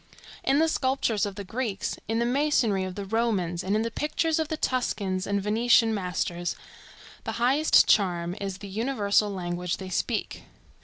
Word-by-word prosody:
In 270 - +3
the 320 +2 +4
sculptures 260 -8 0
of 200 - -7
the 200 - -6
Greeks, 220 0 -3
in 225 +1 0
the 235 - +1
masonry 245 -7 +2
of 185 -1 -6
the 200 -1 -5
Romans, 195 -5 0
and 195 +2 0
in 215 - +1
the 230 - -3
pictures 310 +4 0
of 320 - 0
the 315 0 -3
Tuscan 200 -9 -1
and 200 0 +1
Venetian 225 +2 +3
masters, 180 -3 -2 0.7
the - - -4
highest 270 +6 +4
charm 175 -3 +2
is 195 -1 -3
the 200 - -9
universal 210 -1 +1
language 180 -2 -3
they 190 -1 -7
speak. 185 - -2
210 Hz, 170 wpm, -27 LUFS, 190-245 Hz, 0.7 s, the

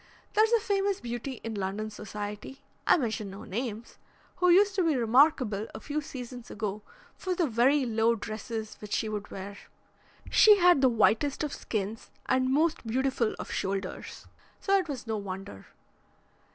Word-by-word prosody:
"There's 435 +1 +4
a 470 - +5
famous 400 -2 0
beauty 240 +2 -5
in 225 - -4
London 205 +2 -3
society 210 +5 -7 0.2
I - - +6
mention 220 - -2
no 195 +3 -9
names 225 +1 -5 0.4
who 360 - +3
used 400 +3 +6
to 385 -2 +1
be 320 -3 +2
remarkable 240 -3 +3
a - - -5
few 295 +6 -3
seasons 250 -4 -8
ago 210 -1 -4 0.3
for 370 -1 -3
the 345 - +2
very 260 +3 +3
low 230 0 +2
dresses 220 0 -6
which 210 -1 -7
she 220 - 0
would 210 -1 -4
wear. 200 +1 -7 0.7
She 425 -2 +7
had 355 -6 +5
the 260 - +6
whitest 235 +6 +2
of 295 - -3
skins 215 0 -4 0.2
and 260 0 +2
most 310 +4 +2
beautiful 255 -1 0
of - - -7
shoulders, 190 -1 -4 0.3
so 395 - +2
it 375 -3 +2
was 260 -3 -5
no 220 -1 -2
wonder. 190 - -7
235 Hz, 165 wpm, -29 LUFS, 215-295 Hz, 0.7 s, She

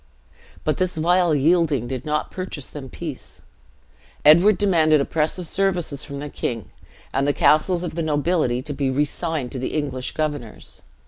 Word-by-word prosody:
But - - 0
this 185 -2 -1
vile 175 0 +3
yielding 150 -4 +2
did 130 +2 -5
not 150 0 -1
purchase 185 -7 -5
them 135 -3 -9
peace: 155 -3 -8 0.8
Edward 175 +7 +7
demanded 160 -7 +4
oppressive 160 +5 -1
services 175 -6 0
from 140 - -7
the 145 +1 -5
king, 115 -5 -4 0.4
and 135 +1 +1
the 145 - +2
castles 170 +5 +3
of 175 - -4
the 170 - -2
nobility 150 -4 0
to 145 - -3
be 135 -1 -1
resigned 145 0 -1
to 130 -1 -5
English 135 -4 -3
governors. 145 -7 -4
150 Hz, 150 wpm, -22 LUFS, 140-170 Hz, 0.8 s, Edward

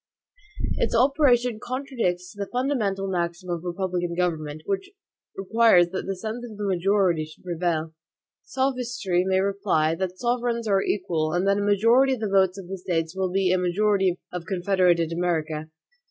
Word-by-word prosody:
Its - - 0
operation 250 -3 +3
contradicts 240 -9 -3
the 200 -1 -5
fundamental 235 -7 -1
maxim 175 0 -3
of 170 -1 -3
republican 175 -1 -2
government, 155 -4 -2
which 200 - -2 0.5
requires 195 -3 +4
that 190 - -5
the 195 - -2
sense 220 +5 -5
of 225 -4 -9
the 210 - -3
majority 185 -3 +2
should 155 0 -13
prevail. 170 -2 -2 0.5
Sophistry 245 -9 -1
may 190 0 +1
reply, 195 -5 +1
that 185 +2 -3
sovereigns 240 -1 -1
are 195 -2 +3
equal, 160 -7 -1
and 180 +2 +1
that 200 +1 +3
a - - 0
majority 230 +7 +4
of - - -11
the 215 - 0
votes 190 -1 +3
of 190 -3 -8
the 190 +1 -6
States 165 -1 -2
will 190 -1 0
be 190 0 +1
a 185 - +2
majority 190 0 +1 0.2
of 180 -2 -5
confederated 180 -3 +2
America. 160 -3 -2
190 Hz, 160 wpm, -25 LUFS, 175-215 Hz, 0.5 s, requires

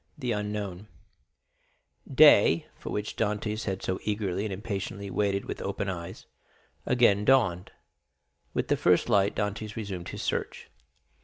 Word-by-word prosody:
The 125 -5 -2
Unknown 105 -2 -4 1.2
Day, 130 - +6
for - - -8
which 105 0 -3
Dantès 105 0 -2
had 95 -2 -3
so 95 - -2
eagerly 105 -2 -2
and 105 - -3
impatiently 100 0 -5
waited 100 -1 0
with - - -6
open 100 - -3
eyes, 90 -1 -7 0.6
again 115 -5 +4
dawned. 105 -8 +3 0.9
With - - -1
the - - +2
first 90 +6 +3
light 100 -2 +3
Dantès 105 +1 -3
resumed 100 -5 -5
his - - -6
search. - - -3
105 Hz, 135 wpm, -28 LUFS, 95-110 Hz, 1.2 s, Day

